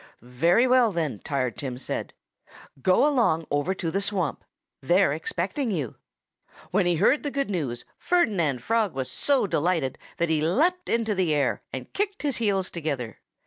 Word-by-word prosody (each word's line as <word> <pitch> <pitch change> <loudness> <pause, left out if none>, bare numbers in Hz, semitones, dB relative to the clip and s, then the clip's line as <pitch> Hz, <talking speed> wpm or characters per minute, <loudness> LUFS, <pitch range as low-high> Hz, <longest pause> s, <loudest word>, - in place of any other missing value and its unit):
"Very 165 - +3
well, 250 -3 +4
then!" 155 - -2
Tired 130 -5 -2
Tim 130 -3 -4
said. 130 - -4 0.7
"Go 185 - +4
along 230 - +2
over 145 +7 0
to 165 -3 -3
the 195 - 0
swamp. 195 -7 -2 0.4
They're 175 +2 +3
expecting 185 - -2
you." 150 - -2 0.8
When 185 -1 +2
he 175 - +2
heard 215 - +3
the 290 - -2
good 275 -4 -2
news 140 -10 -3
Ferdinand 175 - +1
Frog 220 -5 +1
was 130 -1 -2
so 280 -5 +2
delighted 165 -6 0 0.2
that 170 - 0
he 155 -2 +2
leaped 325 - +1
into 225 -2 +1
the 180 -6 +1
air 145 - 0
and - - -7
kicked 405 -3 -2
his 285 -4 0
heels 200 -5 0
together. 140 -9 -4
180 Hz, 165 wpm, -26 LUFS, 145-230 Hz, 0.8 s, well